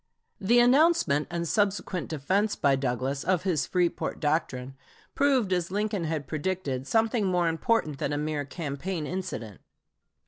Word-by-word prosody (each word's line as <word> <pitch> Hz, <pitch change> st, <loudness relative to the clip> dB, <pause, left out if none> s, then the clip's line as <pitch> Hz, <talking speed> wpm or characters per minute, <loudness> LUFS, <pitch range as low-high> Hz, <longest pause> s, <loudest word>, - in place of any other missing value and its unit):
The 225 Hz, +5 st, +3 dB
announcement 250 Hz, -, +4 dB
and 170 Hz, -1 st, -3 dB
subsequent 200 Hz, -2 st, 0 dB
defense 190 Hz, +8 st, 0 dB
by 140 Hz, -2 st, +3 dB
Douglas 135 Hz, +2 st, -2 dB
of 180 Hz, -1 st, +1 dB
his 165 Hz, -8 st, 0 dB
"Freeport 180 Hz, -2 st, -1 dB
doctrine" 145 Hz, -4 st, -1 dB, 0.4 s
proved, 265 Hz, -9 st, +2 dB
as 175 Hz, -2 st, 0 dB
Lincoln 205 Hz, -2 st, -1 dB
had 155 Hz, -2 st, -2 dB
predicted, 150 Hz, -3 st, -3 dB
something 225 Hz, -, +2 dB
more 180 Hz, -2 st, +2 dB
important 165 Hz, -, 0 dB
than 140 Hz, -, -1 dB
a 145 Hz, -, -1 dB
mere 150 Hz, 0 st, -2 dB
campaign 155 Hz, +3 st, -4 dB
incident. 175 Hz, -, -5 dB
170 Hz, 140 wpm, -27 LUFS, 145-200 Hz, 0.4 s, announcement